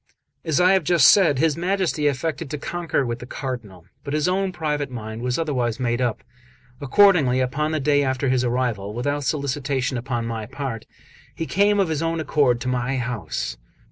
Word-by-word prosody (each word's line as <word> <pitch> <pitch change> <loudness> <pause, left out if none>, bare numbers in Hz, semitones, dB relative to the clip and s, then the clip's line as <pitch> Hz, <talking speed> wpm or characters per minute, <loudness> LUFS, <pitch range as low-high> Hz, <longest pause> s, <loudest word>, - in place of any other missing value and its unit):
XXXIX - - -5
AS 155 - +2
I 180 +1 +5
have 190 -3 +2
just 165 -1 +6
said, 170 -9 +4
his 155 +1 +2
Majesty 175 -3 0
affected 150 +2 -2
to 150 - -3
concur 165 -2 -2
with 120 0 -3
the 125 - -9
Cardinal, 115 - -6 0.2
but 140 0 -3
his 150 +1 +1
own 190 +1 0
private 150 -5 -2
mind 110 -2 -7
was 125 0 -1
otherwise 125 -7 -1
made 120 -1 0
up. 120 -3 -1 0.6
Accordingly, 145 -4 +4
upon 140 +5 -1
the 155 - 0
day 145 0 +2
after 130 +1 -1
his 130 -1 +2
arrival, 120 -5 -1
without 145 +4 -1
solicitation 140 -3 -1
upon 120 -1 -3
my 115 -2 -4
part, 130 -3 -5 0.5
he 165 - -3
came 205 +4 +2
of 190 -4 +2
his 155 -1 -1
own 165 0 -1
accord 140 -6 +2
to 125 - -4
my 125 +1 -1
house. 115 - -3
135 Hz, 190 wpm, -23 LUFS, 125-160 Hz, 0.6 s, just